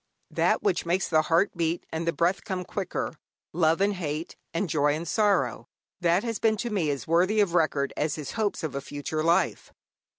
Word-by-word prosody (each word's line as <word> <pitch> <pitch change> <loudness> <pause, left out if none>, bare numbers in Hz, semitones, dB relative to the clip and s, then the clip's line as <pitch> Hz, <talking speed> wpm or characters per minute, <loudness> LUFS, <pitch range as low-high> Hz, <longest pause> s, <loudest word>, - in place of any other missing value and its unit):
That - - +1
which 405 -3 +1
makes 175 +2 0
the 155 -2 +4
heart 165 +5 +2
beat 170 0 -1
and 160 +1 -3
the - - +3
breath 175 +3 0
come 185 -3 -4
quicker, 190 -1 -3 0.4
love 165 +1 +2
and 205 +1 +3
hate, 160 -3 -4 0.2
and 185 +4 -1
joy 145 -2 +2
and 165 +2 -5
sorrow 150 - +1 0.3
that 175 +1 +2
has 230 -2 -3
been 220 -1 +2
to 235 +2 -3
me 180 -7 0
as 140 -2 -2
worthy 180 +6 +3
of 200 -5 +2
record 155 -5 +1
as 150 -1 -1
his 150 -3 -6
hopes 215 -5 -1
of 160 - -3
a 140 - -3
future 145 +2 -4
life. 165 +1 +1
170 Hz, 200 wpm, -27 LUFS, 155-195 Hz, 0.4 s, the